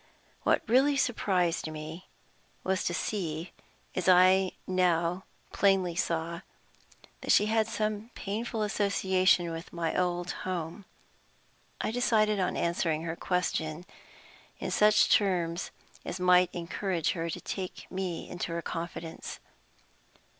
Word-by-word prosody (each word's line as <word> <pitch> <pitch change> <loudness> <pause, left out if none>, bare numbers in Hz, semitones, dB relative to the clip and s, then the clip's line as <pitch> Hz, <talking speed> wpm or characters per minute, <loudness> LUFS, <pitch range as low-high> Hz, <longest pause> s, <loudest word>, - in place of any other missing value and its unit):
What - - +1
really 270 +4 +4
surprised 185 -11 +1
me 155 +3 -8 0.5
was 190 0 0
to - - +1
see, 170 -5 -3 0.4
as 185 0 0
I 185 +1 +6
now 180 -1 +1 0.3
plainly 195 -3 +3
saw, 170 0 -1 0.8
that - - 0
she 210 - +6
had 220 0 +2
some 215 0 -2
painful 220 +2 -3
association 190 -4 +2
with 165 +1 -7
my 165 -2 -2
old 175 -1 0
home. 180 +1 -4 0.9
I - - -1
decided 215 -3 +2
on 185 - 0
answering 165 -2 0
her 165 0 -3
question 175 -2 -1 0.7
in - - -4
such 210 0 +5
terms 180 -4 +1 0.3
as 185 - -5
might 180 0 +5
encourage 175 0 -1
her 165 -1 -3
to - - -4
take 185 -2 -5
me 185 -3 -3
into 175 -1 -4
her 170 0 -3
confidence. 165 0 -6
180 Hz, 120 wpm, -29 LUFS, 170-200 Hz, 0.9 s, I